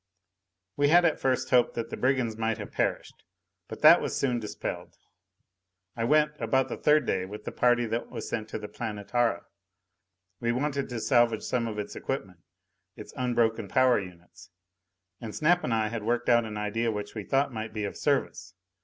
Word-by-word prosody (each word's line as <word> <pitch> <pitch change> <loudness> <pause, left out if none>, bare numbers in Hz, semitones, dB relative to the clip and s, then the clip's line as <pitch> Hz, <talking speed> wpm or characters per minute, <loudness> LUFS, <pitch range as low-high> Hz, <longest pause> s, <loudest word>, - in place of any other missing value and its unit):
We 145 0 +3
had 175 +4 +5
at 160 - +1
first 130 -1 0
hoped 125 -2 +3
that 115 0 -4
the - - -3
brigands 130 -4 0
might 115 0 -1
have - - -8
perished. - - -2 0.4
But - - -9
that - - +9
was - - -3
soon 125 -3 0
dispelled! 105 -2 -6 1.0
I 115 - -1
went 150 +3 +3
about 130 -1 +1
the - - -4
third 150 -2 +3
day 95 -4 0
with 105 +2 -9
the - - -4
party 120 -1 +2
that 115 +1 -3
was - - -6
sent 110 -1 -4
to - - -4
the 105 -1 -7
Planetara. 115 +2 -2 0.9
We 120 0 0
wanted 140 +1 -2
to 120 -2 -4
salvage 120 -2 +2
some 120 -2 -1
of 110 -2 -5
its 105 - -5
equipment, 100 -10 -5 0.6
its - - -11
unbroken 115 -3 0
power 130 +3 +3
units. 90 0 -12 0.7
And 110 -3 -7
Snap 175 +3 +2
and 125 - -2
I 110 -1 +1
had 115 0 -4
worked 120 +3 -1
out 120 -1 +4
an 105 -1 -6
idea 115 +2 -1
which 105 -1 -5
we 105 - -5
thought 135 +4 0
might 110 0 -5
be 110 -1 -4
of 100 - -4
service. 130 -10 -1
115 Hz, 190 wpm, -28 LUFS, 110-130 Hz, 1.0 s, that